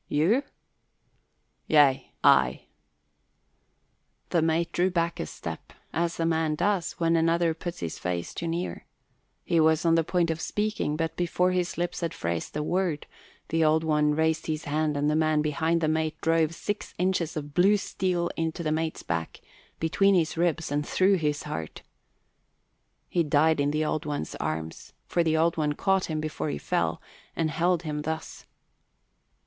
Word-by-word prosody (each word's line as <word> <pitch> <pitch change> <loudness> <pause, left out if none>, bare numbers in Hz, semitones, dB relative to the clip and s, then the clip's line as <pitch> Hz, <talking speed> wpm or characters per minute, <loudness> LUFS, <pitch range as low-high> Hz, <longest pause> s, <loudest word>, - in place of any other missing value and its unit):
"You?" 175 - +2 1.3
"Yea, 145 -4 +4
I." 65 -1 +4 1.7
The 170 - +3
mate 165 +1 +1
drew 180 +2 +2
back 170 -2 -1
a - - -3
step, - - -8 0.2
as 170 0 -1
a 165 - +1
man 160 -2 +1
does 195 0 0
when 165 0 +1
another 165 0 +2
puts 170 +1 -6
his 85 -2 -4
face 90 -1 -3
too 170 - -4
near. 170 +2 -4 0.6
He 170 - +2
was 160 +1 +3
on 165 - +4
the 165 0 +4
point 170 0 +1
of 160 0 -4
speaking; 210 -7 -1
but 165 +1 -2
before 180 +1 +1
his 180 -1 -1
lips 175 +1 -2
had 165 -2 -2
phrased 85 - -3
a 150 - -1
word 175 -2 -1 0.4
the 165 0 +2
Old 155 +1 +3
One 150 -1 +2
raised 160 0 +1
his 155 -1 -2
hand 150 0 0
and 145 +1 +1
the 150 - +2
man 155 -1 +2
behind 160 +2 0
the 155 - +2
mate 155 0 -1
drove 165 0 +1
six 205 +3 -4
inches 180 -3 0
of 145 -1 -6
blue 195 +5 +5
steel 180 -3 -1
into 165 +1 -2
the 155 - 0
mate's 160 0 -2
back, 85 -1 -3 0.4
between 195 +5 +3
his 160 -3 +1
ribs 170 -2 0
and 145 +1 0
through 190 +5 +3
his 150 -3 -1
heart. 80 -1 -6 1.2
He 175 - +1
died 155 0 +3
in 140 0 +2
the 155 +1 0
Old 155 - -2
One's 145 - -3
arms, 80 +1 -4
for 170 - +1
the 160 -1 +2
Old 165 +1 +2
One 150 -2 +1
caught 190 +4 +1
him 155 -1 -3
before 155 0 -3
he - - -2
fell, - - -1 0.3
and 160 -2 0
held 175 +1 +1
him 150 -2 -3
thus. 160 +1 -5
160 Hz, 170 wpm, -27 LUFS, 150-170 Hz, 1.7 s, blue